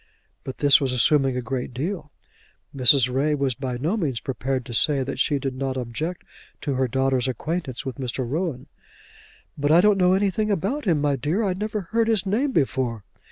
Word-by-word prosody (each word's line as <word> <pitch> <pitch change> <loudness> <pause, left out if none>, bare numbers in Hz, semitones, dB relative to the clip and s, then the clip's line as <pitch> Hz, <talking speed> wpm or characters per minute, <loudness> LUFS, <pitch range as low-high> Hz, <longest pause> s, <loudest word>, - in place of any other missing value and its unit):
But 130 - -7
this 145 -1 +5
was 135 -2 0
assuming 135 +1 +3
a 125 - -3
great 125 -1 -4
deal. 155 +2 -4 0.6
Mrs. 130 -1 +5
Ray 150 +3 +1
was 140 -2 0
by 130 0 -4
no 155 - -1
means 140 - -1
prepared 130 -1 -3
to 120 - -8
say 140 +3 +3
that 135 - -5
she 145 - +2
did 135 -1 -3
not 130 0 -3
object 150 +9 -4 0.4
to 145 - -2
her 130 0 +1
daughter's 130 0 +1
acquaintance 135 +1 -3
with 130 -1 -5
Mr. 130 -1 -3
Rowan. 150 -2 -3 0.9
"But 145 +1 +1
I 165 - +7
don't 205 +1 +4
know 180 0 +4
anything 205 +2 +1
about 205 - -1
him, 165 -6 +2
my 145 -1 +1
dear. 155 - -1
I 195 -3 +1
never 210 +2 -3
heard 225 +5 0
his 220 -4 +1
name 240 +9 0
before." 130 - -1
140 Hz, 195 wpm, -24 LUFS, 130-180 Hz, 0.9 s, I